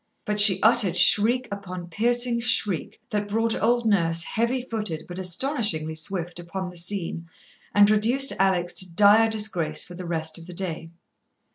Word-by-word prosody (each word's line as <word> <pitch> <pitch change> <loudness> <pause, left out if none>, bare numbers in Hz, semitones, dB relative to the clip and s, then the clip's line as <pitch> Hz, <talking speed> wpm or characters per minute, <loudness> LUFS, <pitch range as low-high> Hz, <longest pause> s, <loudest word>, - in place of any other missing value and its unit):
But 210 -2 -2
she 205 -3 +6
uttered 215 -6 +2
shriek 240 +4 +5
upon 185 -3 -7
piercing 240 +4 0
shriek 210 -7 0
that 210 -1 -2
brought 225 +2 0
old 240 +1 0
Nurse, 170 -6 +1
heavy 235 +6 -2
footed 215 -10 -5
but 180 +1 -8
astonishingly 185 - -1
swift, 175 +2 -3
upon 180 +1 -7
the - - -16
scene, 170 -2 -3 0.5
and 205 0 +6
reduced 235 +6 +2
Alex 180 -2 +1
to 185 -2 -3
dire 210 +5 +4
disgrace 190 -8 +1
for 180 - -10
the 180 0 -9
rest 160 -1 -3
of 165 - -13
the 180 - -10
day. 165 -3 -6
195 Hz, 160 wpm, -23 LUFS, 175-225 Hz, 0.5 s, she